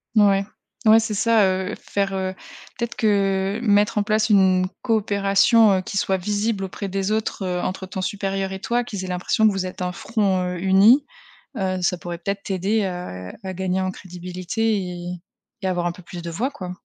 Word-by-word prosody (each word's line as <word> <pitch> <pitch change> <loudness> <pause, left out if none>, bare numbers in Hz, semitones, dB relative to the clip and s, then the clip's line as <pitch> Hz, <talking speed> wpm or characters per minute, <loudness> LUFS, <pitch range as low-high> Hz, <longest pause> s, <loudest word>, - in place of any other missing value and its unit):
Ouais. 200 -2 +5 0.4
Ouais 220 +1 +8
c'est 220 -1 -2
ça, 225 0 +4
heu, 190 +1 -1
faire, 195 -1 -2
heu, 190 -1 -2 0.4
peut-être 235 -1 -3
que 195 -2 +1
mettre 210 -2 +3
en 210 - +3
place 215 +1 +1
une 190 -3 +4 0.2
coopération, 210 0 +4
heu, - - -3
qui 195 +2 -5
soit 190 - +1
visible 205 +2 -1
auprès 195 +1 -5
des 195 +2 -2
autres, 215 -2 -1
heu, 180 -1 -1
entre 190 +1 -3
ton 190 +1 -6
supérieur 195 0 -2
et 190 - -5
toi, 240 -2 0
qu'ils 200 -5 -5
aient - - -5
l'impression 180 +4 +1
que 215 - +6
vous 195 -1 -2
êtes 185 0 -7
un 180 0 -1
front, 195 -1 0
heu, - - -5
uni, 195 +9 +5 0.5
heu, 185 -2 -1
ça 180 0 +1
pourrait 175 0 -6
peut-être 200 +3 -4
t'aider, 195 +3 0
heu, 180 - -5
à 190 -1 -4
gagner 185 0 -1
en 185 - -1
crédibilité 185 +4 -3
et 180 -2 -5 0.6
et - - 0
avoir 175 -2 -1
un 175 - +1
peu 180 - -12
plus 175 0 -9
de 170 - -5
voix 235 +11 -1
quoi. 185 -10 -7
195 Hz, 200 wpm, -22 LUFS, 185-210 Hz, 0.6 s, Ouais